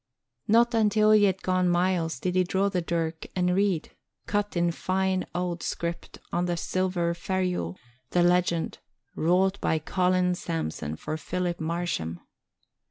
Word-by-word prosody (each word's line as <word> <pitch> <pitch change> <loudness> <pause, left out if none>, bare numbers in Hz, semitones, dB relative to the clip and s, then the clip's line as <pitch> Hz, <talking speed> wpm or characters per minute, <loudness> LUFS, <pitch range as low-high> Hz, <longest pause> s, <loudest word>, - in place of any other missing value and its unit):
Not 235 +2 +4
until 215 -1 +4
he 210 -1 +6
had 190 -1 0
gone 185 -1 +2
miles 175 -4 +1
did 180 +4 -1
he 185 0 +3
draw 190 +3 +1
the 185 -2 -1
dirk 165 -1 -2
and 180 -1 +2
read, 190 -4 +1 0.3
cut 205 -2 -1
in 170 0 +2
fine 185 +1 -1
old 175 -1 -2
script 170 0 -4 0.2
on 175 +1 +1
the 175 -1 -1
silver 180 -1 0
ferule, 180 - -2 0.3
the 175 - +3
legend, 175 -1 +1 0.4
Wrought 185 +4 +2
by 160 - +2
Colin 180 +3 +1
Samson 160 - -3
for 155 - -4
Philip 175 +1 -2
Marsham. 160 - -2
180 Hz, 145 wpm, -27 LUFS, 170-190 Hz, 0.4 s, he